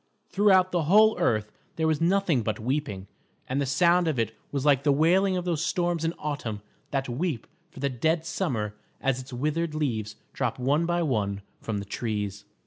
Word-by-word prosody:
Throughout 190 -2 +4
the 175 -3 0
whole 215 +6 +6
earth 110 -1 +1 0.2
there 160 - 0
was 155 -1 +1
nothing 175 -6 +2
but 110 -1 -2
weeping, 115 -5 -2 0.4
and 135 +2 -1
the 140 - -1
sound 170 +5 +3
of 155 -5 0
it 115 -1 0 0.2
was 140 -1 -2
like 140 -3 +5
the 145 0 +3
wailing 185 +6 +3
of 180 - -3
those 165 -3 0
storms 175 -2 0
in 165 +1 0
autumn 130 -9 -4 0.3
that 135 -1 -1
weep 130 0 -2 0.2
for 140 - -12
the 140 - +1
dead 160 +6 0
summer 130 - -2 0.3
as 135 -1 0
its 130 +1 -12
withered 155 +5 -1
leaves 115 -9 -2 0.2
drop - - -1
one 145 +6 +1
by 175 0 +1
one 100 -8 -1 0.2
from 110 -2 -3
the 100 - -4
trees. 105 -2 -3
145 Hz, 190 wpm, -27 LUFS, 115-170 Hz, 0.4 s, whole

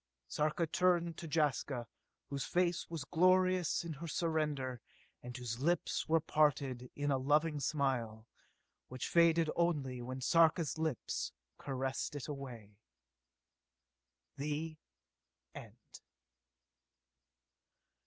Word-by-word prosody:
Sarka 155 - 0
turned 170 0 +2
to 170 - -6
Jaska, 145 -5 0 0.5
whose 140 -2 -2
face 175 +1 0
was 165 -4 -4
glorious 185 +1 +3
in 165 -1 -4
her 160 +4 -7
surrender, 150 -7 -1 0.4
and 125 0 -7
whose 120 -2 -4
lips 170 +4 0
were 165 0 +5
parted 140 -5 +1
in 145 0 0
a 135 - +2
loving 150 +3 +2
smile 125 -7 -1 0.6
which 130 -1 -5
faded 165 -1 +4
only 145 -8 0
when 130 +2 -5
Sarka's 160 +3 +3
lips 160 -6 -2 0.3
caressed 135 +1 -3
it 145 - -5
away. 120 -8 -8 1.6
(_The 150 +2 -3 0.8
end. - - -12
150 Hz, 105 wpm, -35 LUFS, 130-165 Hz, 1.6 s, were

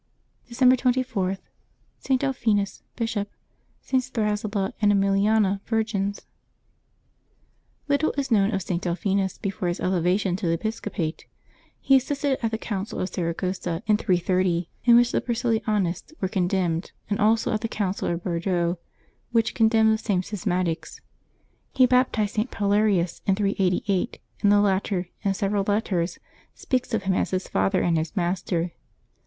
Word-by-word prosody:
December 255 +1 +5
24.— 245 -7 0 0.6
ST. 265 -1 +1
DELPHINUS, 220 -7 0
Bishop.— 225 -3 -2 0.5
STS. 255 -1 0
THRASILLA 210 -3 -1
and 205 -1 +5
EMILIANA, 200 0 +2
Virgins, 215 -3 -1 1.6
HiTTLE 285 +2 +2
is 270 -2 -2
known 205 -1 +4
of 195 -3 -1
St. 175 -1 -2
Delphinus 190 +2 -1
before 190 -2 -3
his 175 +1 -2
elevation 180 +1 +1
to 190 -3 -3
the 165 - +2
episcopate. 170 -3 -3 0.5
He 270 - +5
assisted 280 0 -1
at 225 - +2
the 220 - -2
Council 205 -2 -4
of 185 - -1
Saragossa, 175 0 -3
in 210 -1 +3
330, 180 -3 +1
in 240 -1 +7
which 240 0 +5
the - - +1
Priscillianists 220 - -1
were 190 - 0
con 185 -1 0
demned, 175 -2 -1
and 205 +1 -1
also 220 +2 +2
at 215 - -1
the 225 - -1
Council 200 -3 -2
of 170 0 -2
Bordeaux, 175 -1 -1 0.5
which 230 -2 +2
con 225 - +4
demned 220 -1 +4
the 220 - -1
same 195 -5 0
schismatics. 180 -4 -2 0.7
He 260 - +5
baptized 250 -5 +2
St. 220 +3 -1
Paulerius 200 -4 +1
in 195 - +4
388, 195 +1 0 0.2
and 205 - +4
the 205 0 +5
latter, 190 -2 0
in 195 -2 0
several 200 +1 0
letters, 190 -5 0 0.4
speaks 255 -2 -2
of 210 - -2
him 190 -1 +1
as - - 0
his 185 0 -2
father 95 0 +1
and 170 -2 +2
his 155 0 -4
master. 175 -1 -1
200 Hz, 150 wpm, -25 LUFS, 185-225 Hz, 1.6 s, in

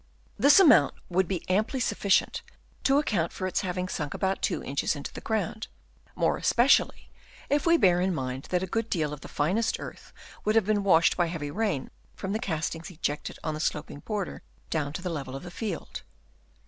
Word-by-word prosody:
This 285 +6 +7
amount 290 - +6
would 185 0 +2
be 185 -2 -3
amply 215 +8 +1
sufficient 200 -5 +1 0.4
to 275 +1 +5
account 205 - +1
for 185 - -4
its 185 - 0
having 180 -1 -2
sunk 150 -5 -4
about 190 0 -1
2 - - -1
inches 140 +3 -1
into 145 - -7
the - - -8
ground; 220 0 -2 0.5
more - - +1
especially 245 +4 +3 0.4
if 290 +3 +2
we 335 0 +6
bear 180 - +4
in 190 +1 +1
mind 130 -4 -3
that 180 0 +1
a - - 0
good 225 +3 -2
deal 155 -5 0
of 150 - -8
the - - -9
finest 190 +11 0
earth - - -9 0.3
would 215 +1 +1
have 225 -4 +4
been 205 -1 +1
washed 170 -4 +4
by 175 -2 +1
heavy 155 -4 -4
rain 200 -7 -1 0.2
from 195 +1 -4
the 215 - -1
castings 165 -2 -3
ejected 150 -4 -4
on 155 - -2
the 155 - -5
sloping 150 -2 -2
border 205 +3 -4 0.3
down 150 -3 -1
to 180 - -6
the 180 - -2
level 135 -5 -5
of 135 - -7
the 175 - -8
field. 195 -3 -5
180 Hz, 200 wpm, -27 LUFS, 155-215 Hz, 0.5 s, This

